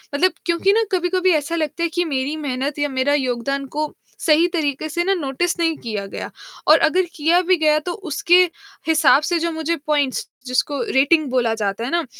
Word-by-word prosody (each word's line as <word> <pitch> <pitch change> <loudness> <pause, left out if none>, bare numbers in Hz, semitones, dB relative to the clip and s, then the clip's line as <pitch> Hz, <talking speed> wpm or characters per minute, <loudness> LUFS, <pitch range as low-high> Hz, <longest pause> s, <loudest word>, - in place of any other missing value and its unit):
मतलब 365 +6 +3
क्योंकि 345 +3 +2
ना 455 - +3
कभी-कभी 370 0 +1
ऐसा 305 +3 -1
लगता 325 +1 -2
है 335 - +1
कि 350 0 0
मेरी 275 0 -2
मेहनत 280 0 -3
या 290 0 0
मेरा 265 +2 0
योगदान 275 0 -1
को 305 0 -2 0.3
सही 325 +1 +4
तरीक़े 305 -2 -1
से 345 +3 -1
ना 390 +2 +2
नोटिस 340 0 -2
नहीं 330 -1 +1
किया 215 -4 -4
गया - - -6 0.4
और 310 +1 +7
अगर 370 +4 +2
किया 330 +3 +3
भी 370 +1 +3
गया, 305 -1 +3
तो 350 +4 -5
उसके 350 -1 +2 0.5
हिसाब 310 -3 +4
से 340 +1 0
जो 335 0 -1
मुझे 320 +1 -2
पॉइंट्स, 290 -4 0 0.2
जिसको 265 +2 0
रेटिंग 295 +4 +3
बोला 240 -3 +1
जाता 210 0 -3
है 245 - -3
ना, 340 -1 0
305 Hz, 195 wpm, -20 LUFS, 275-340 Hz, 0.5 s, और